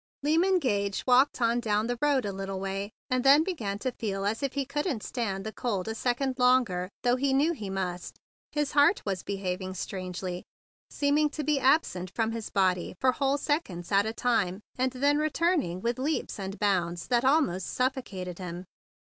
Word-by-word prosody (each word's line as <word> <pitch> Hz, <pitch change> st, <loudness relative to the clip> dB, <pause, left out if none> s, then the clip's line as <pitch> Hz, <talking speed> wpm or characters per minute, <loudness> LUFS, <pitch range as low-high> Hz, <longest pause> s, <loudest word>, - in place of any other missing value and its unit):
Lyman 340 Hz, +6 st, +3 dB
Gage 200 Hz, -, 0 dB
walked 255 Hz, +2 st, +4 dB
on 235 Hz, +1 st, +2 dB
down 215 Hz, -2 st, 0 dB
the 245 Hz, 0 st, -3 dB
road 285 Hz, -4 st, +2 dB
a 200 Hz, -, -2 dB
little 195 Hz, 0 st, -4 dB
way, 195 Hz, +1 st, -3 dB, 0.2 s
and 255 Hz, -1 st, +1 dB
then 280 Hz, +3 st, +7 dB
began 230 Hz, -, -3 dB
to 255 Hz, +5 st, -2 dB
feel 195 Hz, -4 st, -3 dB
as 215 Hz, +2 st, -1 dB
if 275 Hz, -1 st, -1 dB
he 280 Hz, -1 st, -1 dB
couldn't 280 Hz, -, -2 dB
stand 200 Hz, -6 st, -3 dB
the 220 Hz, -, -5 dB
cold 205 Hz, -6 st, -2 dB
a 220 Hz, -, -2 dB
second 255 Hz, +3 st, -1 dB
longer, 245 Hz, -8 st, +3 dB
though 245 Hz, +1 st, +3 dB
he 270 Hz, +1 st, +1 dB
knew 295 Hz, +5 st, +3 dB
he 210 Hz, -, -6 dB
must. 180 Hz, -2 st, -4 dB, 0.3 s
His 295 Hz, -2 st, -1 dB
heart 290 Hz, +6 st, +4 dB
was 195 Hz, -3 st, -2 dB
behaving 185 Hz, -1 st, -4 dB
queerly, 185 Hz, -1 st, -5 dB, 0.5 s
seeming 295 Hz, +1 st, +2 dB
to 305 Hz, 0 st, -4 dB
be 295 Hz, -1 st, +1 dB
absent 255 Hz, -, +2 dB
from 225 Hz, -1 st, +1 dB
his 225 Hz, -1 st, -5 dB
body 185 Hz, -3 st, +1 dB
for 260 Hz, -, +4 dB
whole 275 Hz, +1 st, +1 dB
sec¬ 295 Hz, +3 st, 0 dB
onds 175 Hz, 0 st, -8 dB
at 200 Hz, +1 st, +4 dB
a -, -, -1 dB
time, 220 Hz, -6 st, 0 dB
and 260 Hz, +1 st, +1 dB
then 285 Hz, +3 st, +2 dB
returning 310 Hz, -, 0 dB
with 235 Hz, +3 st, -1 dB
leaps 290 Hz, -4 st, -2 dB
and 195 Hz, +1 st, -5 dB
bounds 175 Hz, -4 st, 0 dB
that 240 Hz, -1 st, +3 dB
almost 265 Hz, -, +2 dB
suffocated 210 Hz, -9 st, -2 dB
him. 180 Hz, 0 st, -6 dB
230 Hz, 190 wpm, -28 LUFS, 195-275 Hz, 0.5 s, then